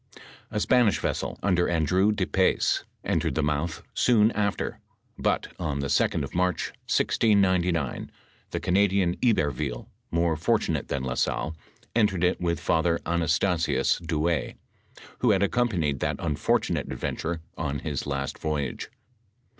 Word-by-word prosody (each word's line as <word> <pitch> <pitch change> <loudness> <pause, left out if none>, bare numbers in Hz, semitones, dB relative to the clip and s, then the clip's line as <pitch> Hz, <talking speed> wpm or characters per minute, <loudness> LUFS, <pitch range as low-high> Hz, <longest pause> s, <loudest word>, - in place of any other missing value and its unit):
A 105 - -2
Spanish 120 -3 +3
vessel - - -2
under 90 -3 +2
Andrew 90 +5 +2
de 100 -3 0
Pes, 95 0 +1 0.2
entered - - 0
the - - +1
mouth 75 +3 -1
soon 115 -3 +4
after; 105 -3 -2 0.4
but, - - 0
on 75 -5 -2
the 70 - -2
2d - - +2
of 70 - -6
March, 90 0 0 0.2
1699, 90 - +2 0.4
the - - -3
Canadian 95 -1 +2
Iberville, 75 - 0 0.2
more 85 -1 +1
fortunate 80 - 0
than 70 -2 -2
La 65 -1 -2
Salle, 80 +5 -1 0.4
entered 100 -6 +2
it 90 0 +1
with 85 -2 0
Father 85 +1 +1
Anasta 85 +2 +1
sius 85 - +1
Douay, 80 -1 -1 0.6
who 125 - +2
had 100 -2 +3
accompanied 95 - +1
that - - 0
unfortunate 75 -3 0
adven - - -3
turer 85 +1 -2 0.2
on 70 -3 -2
his 70 -2 -4
last 70 -1 -3
voyage. 75 -4 -3
85 Hz, 140 wpm, -26 LUFS, 75-100 Hz, 0.6 s, soon